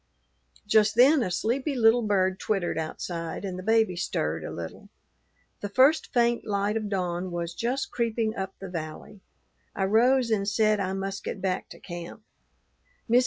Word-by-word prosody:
Just 215 0 +3
then 270 +5 +6
a 220 - 0
sleepy 255 - -1
little 235 0 +5
bird 190 -3 +1
twittered 195 -5 -1
outside, 165 +2 -4
and 185 -1 -4
the - - -5
baby 220 -2 +2
stirred 80 - -2
a - - -5
little. 85 -1 -8 0.7
The 205 - -4
first 265 +9 +4
faint 240 -2 +2
light 205 0 -1
of 215 -2 -2
dawn 180 -2 -2
was 170 -1 -4
just 250 +7 -2
creeping 230 -2 -1
up 190 -2 -4
the 195 - -8
valley. 165 +4 -7 0.5
I 195 - 0
rose 240 +4 +3
and 200 -2 +1
said 215 0 +2
I 190 -1 -1
must 195 0 -4
get - - -4
back 185 -1 -2
to - - -12
camp. 175 +3 -8
200 Hz, 165 wpm, -27 LUFS, 180-230 Hz, 0.7 s, then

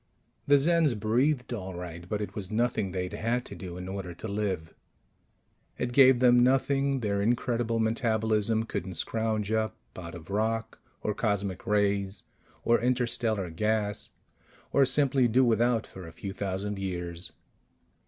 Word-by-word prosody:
The 145 - +6
Zens 155 -5 +3
breathed, 125 +4 +1
all 95 -5 -5
right, 85 0 -8
but 105 0 -1
it 100 -2 -5
was 100 -3 -5
nothing 110 -3 0
they'd 90 0 -4
had 120 +2 -1
to - - -9
do 90 -2 -7
in 90 0 -6
order 95 -2 -5
to 110 - -7
live. 100 -6 -2 1.0
It 120 0 -2
gave 130 -1 +7
them 125 -1 +6
nothing 135 +1 +2
their 100 -2 0
incredible 115 +1 0
metabolism 110 -1 +1
couldn't 95 -4 -5
scrounge 110 +2 -1
up 110 0 0 0.2
out 85 -1 -8
of 85 +2 -10
rock 115 +2 -1 0.2
or 105 - 0
cosmic 100 -2 -2
rays 100 -2 +1 0.4
or 120 - +3
interstellar 115 -6 +2
gas 105 +3 -1 0.6
or 140 -2 +5
simply 135 -1 +3
do 125 +3 +4
without 115 0 +2
for 95 -3 -10
a - - -9
few 95 +4 -6
thousand 100 +1 -3
years. 90 -2 -4
110 Hz, 150 wpm, -28 LUFS, 95-120 Hz, 1.0 s, gave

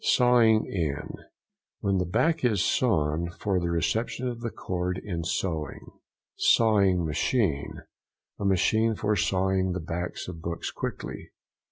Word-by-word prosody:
SAWING 120 -3 +4
IN.—When 90 +4 -4
the 90 - -1
back 160 - +1
is 110 -7 +2
sawn 85 -8 +1
for 95 -3 0
the 85 -1 -2
reception 110 +9 -1
of 120 -1 -5
the 115 - -2
cord 90 -3 -3
in 90 -4 -4
sewing. 80 -3 -3 0.5
SAWING 100 -6 +4
MACHINE.—A 80 - -3
machine 110 +4 +2
for 105 +1 0
sawing 95 0 +1
the 90 - -3
backs 85 +2 -4
of 85 -3 -7
books 85 +1 -4
quickly. - - -6
95 Hz, 125 wpm, -27 LUFS, 85-110 Hz, 0.5 s, SAWING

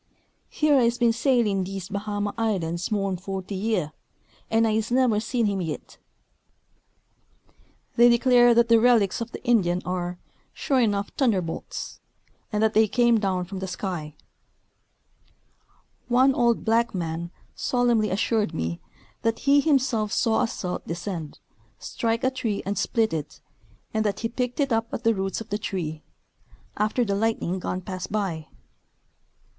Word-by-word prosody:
Here 300 -3 +3
I's 235 -1 +2
been 235 -1 +3
sailing 230 -6 +2
dese 190 0 -6
Bahama 205 0 -3
islands 180 -7 -1
more'n 195 -3 -1
fort}^ 190 +1 -6
year, 195 -5 -1 0.6
an' 225 0 +3
I's 220 0 0
neber 245 -4 +3
seen 235 +1 -1
him 200 -2 0
yit." 160 -3 -6 2.0
They 240 +1 +7
declare 240 0 +5
that 235 0 +4
the 230 -1 +5
relics 230 -4 +3
of 230 0 -4
the - - -9
Indian 185 -7 +2
are 180 -1 -3 0.2
" - - -39
sho' 275 - 0
enuff 205 -5 0
t'underbolts 195 - -2 0.3
" - - -39
and 210 0 0
that 220 0 +2
they 220 0 +5
came 235 +1 +3
down 185 -3 -1
from 190 +1 -7
the 190 - -4
sk}^ 175 -5 -5 1.9
One 255 +2 +4
old 235 -2 +1
black 230 -1 +2
man 170 -1 -3 0.2
solemnly 240 -4 +1
assured 210 0 0
me 80 +1 -3 0.4
that 225 0 -1
he 280 0 +5
himself 260 -8 +1
saw 225 -2 +2
a 245 - +2
celt 180 -5 -5
descend, 170 -3 -5 0.4
strike 230 - -2
a 260 - +2
tree 225 -6 -3
and 200 +1 -2
split 220 +1 0
it, 150 -2 -5 0.5
and 220 0 +1
that 205 -2 -2
he 230 - -1
picked 250 +3 -3
it 275 -4 +1
up 225 0 -1
at 235 - -5
the 230 -1 +4
roots 195 +1 -3
of 225 - -9
the 205 - -2
tree 160 -7 -4 0.4
" - - -38 0.3
after 215 +4 +1
de 200 - -1
lightning 200 -3 -1
done 185 0 -3
pass 185 0 -5
by." 190 -7 -3
215 Hz, 155 wpm, -25 LUFS, 185-235 Hz, 2.0 s, They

